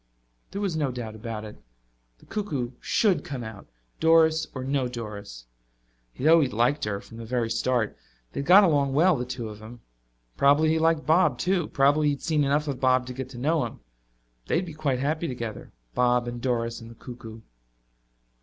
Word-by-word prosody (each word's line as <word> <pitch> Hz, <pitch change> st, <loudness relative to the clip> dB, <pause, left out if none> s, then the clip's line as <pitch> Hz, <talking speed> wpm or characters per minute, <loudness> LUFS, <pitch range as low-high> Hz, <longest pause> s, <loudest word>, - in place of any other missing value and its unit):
There 200 Hz, -, -5 dB
was 195 Hz, -5 st, -1 dB
no 150 Hz, -3 st, 0 dB
doubt 120 Hz, -3 st, -6 dB
about 110 Hz, -1 st, -6 dB
it 105 Hz, -, -10 dB, 0.6 s
the -, -, -21 dB
cuckoo 145 Hz, -, -3 dB
should 190 Hz, -9 st, +1 dB
come 130 Hz, -4 st, -5 dB
out, 110 Hz, -3 st, -9 dB, 0.3 s
Doris 160 Hz, -1 st, +4 dB
or 130 Hz, -, -4 dB
no 135 Hz, -1 st, 0 dB
Doris. 105 Hz, -, -8 dB, 0.7 s
He 125 Hz, -, -9 dB
had 160 Hz, +2 st, +6 dB
always 155 Hz, -6 st, +4 dB
liked 125 Hz, +7 st, +1 dB
her, 100 Hz, -2 st, -2 dB
from 115 Hz, -, -13 dB
the 115 Hz, -, -7 dB
very 115 Hz, 0 st, -1 dB
start. 120 Hz, -3 st, 0 dB, 0.4 s
They -, -, -4 dB
had 140 Hz, -, -4 dB
got 195 Hz, +4 st, +9 dB
along 145 Hz, -6 st, +2 dB
well, 175 Hz, +4 st, +5 dB
the 125 Hz, -, -3 dB
two 120 Hz, -2 st, -5 dB
of 105 Hz, -1 st, -9 dB
them. 115 Hz, +2 st, -11 dB, 0.6 s
Probably 145 Hz, +3 st, +4 dB
he 160 Hz, 0 st, +2 dB
liked 160 Hz, -1 st, +2 dB
Bob 155 Hz, -5 st, +3 dB
too 180 Hz, 0 st, 0 dB
probably 145 Hz, +2 st, +3 dB
he 145 Hz, -, +3 dB
had 140 Hz, -, -8 dB
seen 155 Hz, -3 st, +1 dB
enough 145 Hz, +2 st, +1 dB
of 135 Hz, -3 st, -3 dB
Bob 130 Hz, -1 st, +3 dB
to 125 Hz, -, -6 dB
get 130 Hz, 0 st, -6 dB
to 130 Hz, -, -10 dB
know 150 Hz, +5 st, +1 dB
him. -, -, -6 dB, 0.7 s
They -, -, +1 dB
would 180 Hz, -, +1 dB
be 165 Hz, -, -8 dB
quite 150 Hz, -4 st, -1 dB
happy 155 Hz, +5 st, -1 dB
together, 115 Hz, -6 st, -6 dB, 0.2 s
Bob 125 Hz, -1 st, +2 dB
and 120 Hz, 0 st, -5 dB
Doris 115 Hz, -2 st, -1 dB
and 115 Hz, -, -10 dB
the 115 Hz, -, -12 dB
cuckoo. 115 Hz, -2 st, -10 dB
130 Hz, 200 wpm, -26 LUFS, 120-155 Hz, 0.7 s, got